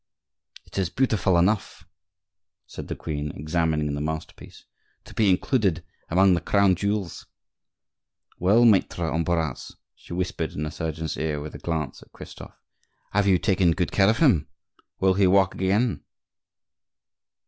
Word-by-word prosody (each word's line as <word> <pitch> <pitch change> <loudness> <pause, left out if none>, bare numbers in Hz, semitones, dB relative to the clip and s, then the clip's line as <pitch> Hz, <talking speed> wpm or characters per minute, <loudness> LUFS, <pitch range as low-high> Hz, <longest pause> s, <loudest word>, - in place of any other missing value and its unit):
"It - - -6
is 95 -3 0
beautiful 105 -6 +1
enough," 95 +4 0 0.8
said - - -9
the - - -4
queen, 75 -2 -4
examining 75 -1 -1
the 75 - -3
masterpiece, 80 +1 -7 0.4
"to - - -13
be 105 -3 +2
included 95 - +1 0.3
among 95 +2 +4
the 85 - 0
crown 100 +1 +3
jewels. 100 0 -3 1.1
Well, 105 +7 +4
Maitre 90 -7 +2
Ambroise," 80 0 -2 0.2
she - - -12
whispered 90 +1 -3
in 75 - -4
the 75 - -4
surgeon's 80 0 -4
ear, 75 -1 -2
with 75 +1 -8
a - - -9
glance 80 -5 -4
at - - -19
Christophe, - - -12 0.5
"have 105 0 +1
you 95 -2 +5
taken 90 -1 +2
good 90 0 -2
care 95 0 +4
of 115 - +2
him? 120 - +3 0.5
Will 95 0 +3
he 95 0 +3
walk 95 0 +3
again?" 100 +5 0
90 Hz, 145 wpm, -24 LUFS, 80-100 Hz, 1.1 s, you